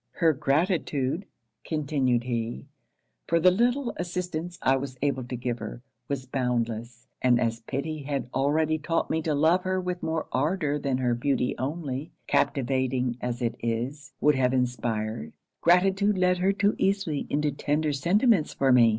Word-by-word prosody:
'Her 165 -2 +3
gratitude,' 150 +1 0 0.4
continued 140 -6 0
he, 120 0 -3 0.6
'for 170 - +3
the 180 +2 +6
little 240 +6 +1
assistance 175 -1 -3
I 135 - +4
was 135 -1 -4
able 140 -3 0
to 125 - -5
give 120 0 -3
her, - - -7 0.2
was 135 -2 -3
boundless; 120 -2 -2 0.2
and 125 -1 +4
as 115 -1 0
pity 150 +6 -4
had 140 -2 -3
already 155 +3 +1
taught 165 +2 -1
me 160 - +1
to 155 -2 0
love 160 +5 +4
her 185 0 -1
with 180 -1 -3
more 160 -1 -1
ardour 150 +1 0
than 135 -2 0
her 125 -2 +1
beauty 125 +1 0
only, 140 0 -3
captivating 130 -2 +1
as 120 0 -3
it 115 -1 0
is, 130 +6 -3
would 150 - +4
have 130 -1 +2
inspired; 115 -6 -2 0.3
gratitude 195 +4 +4
led 180 -1 +3
her 190 +2 +3
too 200 +1 +2
easily 195 -7 0
into 150 0 +1
tender 145 +2 0
sentiments 185 - +2
for 135 -1 +3
me. 120 -2 +7
140 Hz, 160 wpm, -27 LUFS, 125-170 Hz, 0.6 s, me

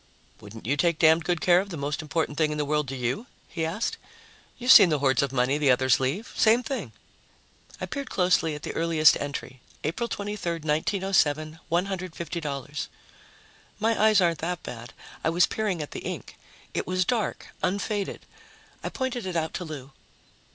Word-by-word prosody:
"Wouldn't 110 +1 -11
you 135 +5 +1
take 170 +2 +2
damned 160 +1 +5
good 175 -1 0
care 175 -1 +5
of 200 - -8
the 170 - -5
most 145 +1 -2
important 155 -1 -2
thing 155 0 +2
in 150 - -3
the 150 - 0
world 150 0 0
to 135 - -4
you?" 130 - -2 0.2
he 165 - -4
asked. 170 +8 -2 0.6
"You've 250 +1 +3
seen 195 -5 +10
the 155 - +2
hoards 135 -2 +2
of 140 -2 -1
money 135 +2 +1
the 145 -2 +3
others 130 0 +4
leave. 135 - -2
Same 230 +3 +4
thing." 265 +3 -4 0.9
I - - -3
peered 280 -2 -5
closely 180 -4 +2
at 150 - -9
the - - -4
earliest 165 -2 +4
entry, 140 -3 -5 0.2
April 235 +11 -2
23, 205 -5 -3
1907, 160 -1 0
$150. 170 -6 -3 0.9
My 225 +1 +1
eyes 215 -2 +6
aren't 170 -3 +2
that 175 +2 -3
bad; 115 -1 -8 0.3
I - - +2
was 170 +2 +4
peering 200 -7 -2
at 145 - -10
the - - -5
ink. - - -6 0.4
It - - -2
was 185 0 +1
dark, 220 +2 -1
unfaded. 200 +1 -2 0.6
I - - -2
pointed 250 -6 -3
it 180 - -4
out 160 -1 -1
to 180 - -4
Lou. 145 -3 -8
165 Hz, 180 wpm, -26 LUFS, 145-190 Hz, 0.9 s, seen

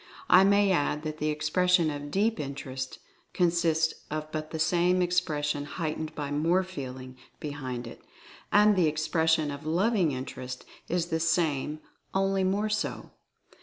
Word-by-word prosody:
I 185 +1 +8
may 200 0 +4
add 150 -3 0
that 155 0 -5
the 155 - 0
expression 160 +2 +2
of 145 0 -6
Deep 210 +5 +1
Interest 135 -2 -5 0.4
consists 165 -2 +2 0.2
of 155 0 -4
but 155 0 -4
the 160 - -5
same 175 +3 +2
expression 150 -5 0
heightened 155 0 -4
by 145 -2 -4
more 165 +6 +2
feeling 130 -7 -8 0.2
be 150 - -4
hind 130 -4 -5
it; 115 - -10 0.5
and 210 0 +6
the 180 -4 +3
expression 155 0 +1
of 140 +2 -7
Loving 185 0 +2
Interest 130 -1 -6 0.2
is 175 0 0
the 160 - 0
same, 155 -3 0 0.3
"only 195 0 +2
more 200 +3 +1
so." 215 0 -3
155 Hz, 150 wpm, -28 LUFS, 145-180 Hz, 0.5 s, I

